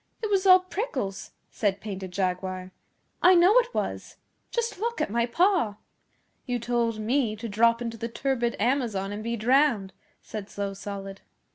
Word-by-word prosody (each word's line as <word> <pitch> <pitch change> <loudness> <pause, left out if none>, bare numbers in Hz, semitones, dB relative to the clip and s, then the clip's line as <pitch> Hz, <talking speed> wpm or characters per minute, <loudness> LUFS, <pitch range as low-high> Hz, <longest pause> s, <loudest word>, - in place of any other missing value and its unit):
It 430 - -1
was 390 -1 +2
all 370 0 +8
prickles,' 290 - -4 0.2
said 200 -2 0
Painted 190 -2 -6
Jaguar. 185 0 -2 0.5
'I 365 +1 +7
know 360 +5 +6
it 485 0 -1
was. - - -4 0.3
Just 470 -5 -2
look 470 +2 -2
at - - -1
my 235 +1 +1
paw!' 345 - +2 0.7
'You 245 -1 0
told 235 -1 0
me 225 +1 0
to 225 +2 -6
drop 230 +3 +3
into 230 -1 -5
the 230 +1 -4
turbid 240 -1 -1
Amazon 230 -7 0
and 210 +1 -5
be 235 +1 -2
drowned,' 235 -4 +2 0.3
said 210 -2 -7
Slow 200 -1 -4
Solid. 195 0 -7
230 Hz, 160 wpm, -26 LUFS, 200-285 Hz, 0.7 s, all